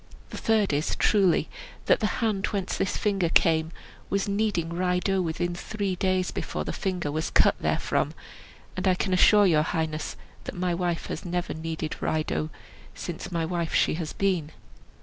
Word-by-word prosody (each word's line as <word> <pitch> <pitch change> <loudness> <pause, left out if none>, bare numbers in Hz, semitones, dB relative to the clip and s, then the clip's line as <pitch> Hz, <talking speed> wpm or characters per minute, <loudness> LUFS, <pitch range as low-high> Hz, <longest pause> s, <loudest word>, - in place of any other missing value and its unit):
The - - -6
third 215 -6 +2
is, 150 +3 0
truly, 195 -5 +3 0.4
that - - +4
the 215 - +1 0.2
hand 210 -4 +1
whence 195 -3 -2
this 195 - -1
finger 195 -5 +1
came 160 -1 +3 0.4
was 200 0 0
kneading 200 -5 0
rye 180 +1 +1
dough 190 +1 +1
within 175 +1 -1
three 195 +1 -3
days 185 -1 0
before - - -3
the - - -4
finger 180 -6 -2
was 155 +1 -2
cut - - +4
therefrom, - - 0 0.6
and 185 +1 -1
I 185 - +4
can 190 +1 -1
assure 205 +3 +6
your 160 -5 +4
highness 160 -1 -2 0.3
that - - -6
my 180 -1 0
wife 170 -1 -1
has - - -5
never 175 0 -2
kneaded 160 -1 -4
rye 155 0 +1
dough 75 - -2 0.5
since - - -6
my 165 -2 0
wife 170 -1 -2
she - - +3
has 160 -1 -3
been." 185 -6 0
180 Hz, 175 wpm, -27 LUFS, 160-195 Hz, 0.6 s, assure